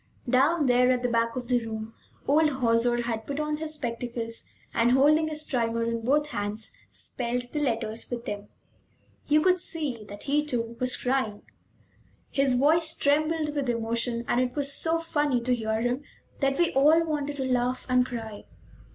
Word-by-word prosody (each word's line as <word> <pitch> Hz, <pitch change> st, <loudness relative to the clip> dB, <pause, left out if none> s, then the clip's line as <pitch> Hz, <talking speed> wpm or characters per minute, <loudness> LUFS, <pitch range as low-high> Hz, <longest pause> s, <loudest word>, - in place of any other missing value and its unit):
Down 285 Hz, +6 st, +3 dB
there 250 Hz, 0 st, +4 dB
at 250 Hz, -1 st, +1 dB
the 245 Hz, -, +1 dB
back 230 Hz, 0 st, +1 dB
of 250 Hz, -1 st, -4 dB
the 245 Hz, -1 st, +1 dB
room 220 Hz, 0 st, -6 dB, 0.3 s
old 305 Hz, +2 st, +4 dB
Hauser 240 Hz, -2 st, +1 dB
had 225 Hz, -2 st, -3 dB
put 285 Hz, +1 st, -3 dB
on 300 Hz, 0 st, -1 dB
his 310 Hz, 0 st, -2 dB
spectacles 235 Hz, -3 st, -4 dB, 0.3 s
and, 235 Hz, +1 st, +3 dB
holding 300 Hz, +4 st, +4 dB
his 305 Hz, -1 st, -3 dB
primer 230 Hz, -4 st, -1 dB
in 230 Hz, 0 st, -2 dB
both 295 Hz, +4 st, +2 dB
hands, 205 Hz, 0 st, -4 dB
spelled 245 Hz, 0 st, -3 dB
the 300 Hz, -, -2 dB
letters 230 Hz, -4 st, -2 dB
with 240 Hz, -1 st, -5 dB
them. 205 Hz, 0 st, -5 dB, 0.8 s
You 300 Hz, +1 st, +4 dB
could 370 Hz, 0 st, +4 dB
see 295 Hz, -10 st, -3 dB
that 205 Hz, 0 st, -10 dB
he, 295 Hz, +1 st, +1 dB
too, 235 Hz, -5 st, -3 dB
was 255 Hz, 0 st, +1 dB
crying; 250 Hz, -5 st, -1 dB, 0.9 s
his 275 Hz, -2 st, +2 dB
voice 315 Hz, +5 st, +3 dB
trembled 305 Hz, +1 st, +1 dB
with 280 Hz, -4 st, -1 dB
emotion, 235 Hz, +1 st, 0 dB
and 245 Hz, -, +2 dB
it 250 Hz, -1 st, -2 dB
was 280 Hz, -1 st, +1 dB
so 325 Hz, +3 st, +1 dB
funny 295 Hz, -5 st, 0 dB
to 250 Hz, +1 st, +1 dB
hear 220 Hz, -2 st, -1 dB
him 245 Hz, +3 st, 0 dB, 0.4 s
that 275 Hz, -1 st, +1 dB
we 345 Hz, -1 st, +2 dB
all 305 Hz, +5 st, +5 dB
wanted 290 Hz, -2 st, -2 dB
to 270 Hz, -2 st, -2 dB
laugh 250 Hz, 0 st, 0 dB
and 250 Hz, -1 st, +4 dB
cry. 225 Hz, -4 st, -7 dB
250 Hz, 175 wpm, -27 LUFS, 230-295 Hz, 0.9 s, all